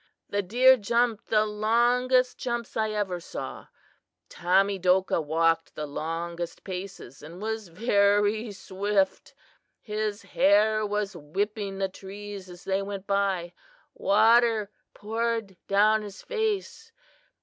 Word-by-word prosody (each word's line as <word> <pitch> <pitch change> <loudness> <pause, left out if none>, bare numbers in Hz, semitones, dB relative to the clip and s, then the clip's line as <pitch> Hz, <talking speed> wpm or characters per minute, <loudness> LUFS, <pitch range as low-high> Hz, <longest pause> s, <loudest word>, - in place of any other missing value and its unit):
The 205 - 0
deer 250 +7 +5
jumped 235 +1 0
the 215 -1 +3
longest 240 +4 +2
jumps 240 -2 -3
I 220 -1 +1
ever 205 -4 -2
saw. 170 - -7 0.6
Tamedokah 185 0 +2
walked 165 +2 +1
the 150 - -4
longest 165 +3 -5
paces 185 -8 -7
and 165 +4 -10
was 220 0 -4
very 205 +3 +2
swift. 195 0 -1 0.4
His 210 -1 -3
hair 215 +2 +3
was 205 -1 -2
whipping 195 +5 -3
the 195 0 0
trees 195 0 -9
as 175 0 -12
they 195 0 0
went 195 -1 -6
by. 195 -4 0 0.4
Water 220 0 +3 0.2
poured 225 -1 -2
down 210 +2 +4
his 205 -2 -9
face. 445 0 -3
205 Hz, 115 wpm, -27 LUFS, 190-220 Hz, 0.6 s, deer